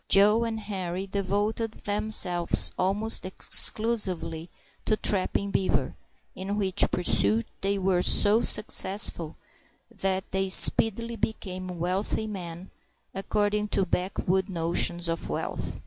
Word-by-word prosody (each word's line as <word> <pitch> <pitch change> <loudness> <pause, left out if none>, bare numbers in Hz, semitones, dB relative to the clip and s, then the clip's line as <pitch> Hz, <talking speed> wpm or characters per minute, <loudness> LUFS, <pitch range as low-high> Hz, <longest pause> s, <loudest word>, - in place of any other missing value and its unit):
Joe 210 +4 +5
and 225 -1 -4
Henri 190 -3 -5
devoted 205 +3 -2
themselves 205 -5 +1
almost 205 +4 +1
exclusively 185 -4 -2 0.3
to 215 - 0
trapping 200 0 +1
beaver, 190 - -1 0.4
in 195 +2 -5
which 195 -2 +2
pursuit 115 - +2 0.2
they 200 +1 -1
were 190 -2 0
so 210 +4 +4
successful 195 -5 +2 0.6
that 190 0 -2
they 190 0 -1
speedily 230 +4 +4
became 185 -4 -5
wealthy 185 +5 -2
men, 180 -3 -8 0.4
according 210 +2 -1
to 195 -2 -1
backwood 185 +1 -2
notions 170 0 0
of 165 0 -4
wealth. - - -5
195 Hz, 110 wpm, -26 LUFS, 180-210 Hz, 0.6 s, Joe